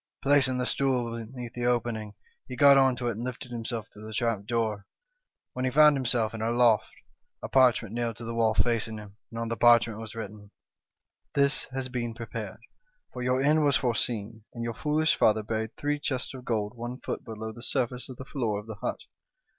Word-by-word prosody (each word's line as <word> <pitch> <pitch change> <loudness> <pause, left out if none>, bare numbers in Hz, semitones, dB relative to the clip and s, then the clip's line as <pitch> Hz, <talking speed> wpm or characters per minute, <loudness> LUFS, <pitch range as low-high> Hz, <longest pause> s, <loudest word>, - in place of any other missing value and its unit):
Placing 135 -2 +4
the 125 - 0
stool 125 -4 0
beneath 120 +1 -7
the 120 -1 -1
opening, 115 -4 -1 0.3
he 125 - -6
got 140 +1 +7
on 135 -2 +5
to 120 -1 -3
it, 110 - -3
and 115 - -4
lifted 125 0 -6
himself 115 -2 -4
through 105 +1 -10
the 110 - -7
trap 115 -4 -1
door, 110 -3 -1 0.7
when 130 - -3
he 130 - +2
found 150 +2 +6
himself 120 -4 +1
in 110 - -5
a 110 - 0
loft, 120 -2 +3 0.5
a - - -2
parchment 125 -5 +3
nailed 120 -1 -2
to 115 - -9
the 115 - -4
wall 115 -1 +2
facing 115 -2 +1
him, 105 -1 -11
and 115 - -9
on 115 0 -2
the 115 - -1
parchment 115 -1 +5
was 115 0 -8
written, 105 -2 -7 0.4
' - - -55
This 140 0 +2
has 130 -1 -4
been 120 -2 -3
pre 115 0 -6
pared, - - -6 0.5
for - - -5
your 130 +1 +1
end 150 +2 +4
was 140 -2 +4
foreseen, 115 -3 -2
and 115 - -4
your 115 0 -2
foolish 150 +4 +1
father 110 0 +3
buried 110 +1 -3
three 145 0 -1
chests 130 -3 -2
of 130 -1 -10
gold 105 -1 -1
one 120 +2 -6
foot - - -4
below 110 -1 -6
the 120 +2 -11
surface 125 -1 -1
of 130 - -9
the 130 - -8
floor 115 -8 -2
of 105 - -10
the 110 -2 -8
hut. - - -3
120 Hz, 215 wpm, -28 LUFS, 110-130 Hz, 0.7 s, got